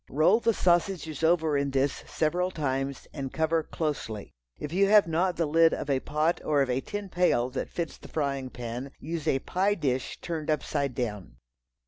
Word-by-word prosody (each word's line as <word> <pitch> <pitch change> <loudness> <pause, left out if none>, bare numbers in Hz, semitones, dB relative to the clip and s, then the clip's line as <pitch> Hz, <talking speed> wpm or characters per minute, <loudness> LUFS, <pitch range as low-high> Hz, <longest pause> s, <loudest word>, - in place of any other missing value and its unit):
Roll 165 - +4
the 230 - +3
sausages 175 -5 +1
over 160 -2 +3
in 140 0 +1
this 135 +1 0
several 175 +3 0
times 135 -5 -2
and 135 -3 -4
cover 160 +1 +1
closely. 145 -11 -4 0.2
If 150 +2 -6
you 195 +2 +4
have 210 0 +7
not 175 +2 +1
the 165 - +1
lid 165 +2 +4
of 145 - -3
a 135 - +2
pot 155 +5 0
or 145 -2 +3
of 130 - -2
a 125 +2 0
tin 205 +5 -5
pail 175 -9 +2
that 130 - -3
fits 170 -3 -4
the - - -11
frying 140 -4 -2
pan, 125 +2 -6
use 160 +1 -4
a 135 - +3
pie 190 +8 0
dish 130 -7 -2
turned 160 -2 -4
upside 140 -3 -1
down. 105 - -4
155 Hz, 185 wpm, -28 LUFS, 135-170 Hz, 0.2 s, have